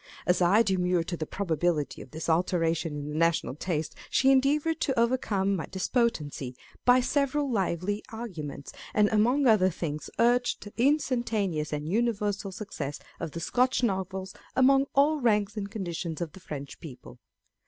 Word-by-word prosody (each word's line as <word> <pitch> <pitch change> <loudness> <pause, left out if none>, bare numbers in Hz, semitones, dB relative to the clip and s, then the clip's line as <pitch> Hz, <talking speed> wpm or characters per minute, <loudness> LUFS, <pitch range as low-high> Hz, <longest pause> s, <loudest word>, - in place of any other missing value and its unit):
As 180 +1 +2
I 195 +6 +5
demurred 180 -4 +1
to 175 - -2
the 155 - -4
probability 170 -5 -1
of - - -11
this 160 +4 -6
alteration 165 -1 +1
in 145 0 -5
the 150 - -5
national 165 -3 +1
taste, 155 +1 -3 0.2
she 270 0 +4
endeavoured 295 +5 +2
to 265 -6 +1
overcome 215 -5 +1
my 165 - -4
despon 235 +6 +1
dency 145 - -7 0.3
by 250 +1 +6
several 280 +1 0
lively 195 0 -1
arguments, 165 -12 -6 0.2
and 210 -1 +4
among 245 +7 +3
other 215 -6 +5
things, 155 -3 -4
urged 245 +1 +2
the 205 - -10
instantaneous 235 - +1
and 150 0 -3
universal 205 -1 0
success 185 - -5 0.2
of 165 -3 -5
the 170 - -4
Scotch 250 +8 +1
Novels 190 -3 -2 0.2
among 270 +1 +5
all 295 +3 +4
ranks 210 -3 +2
and 200 -2 -4
conditions 175 -6 -4
of 170 -3 -3
the 190 - -13
French 140 -5 -7
people. 130 -4 -11
195 Hz, 160 wpm, -28 LUFS, 165-240 Hz, 0.3 s, by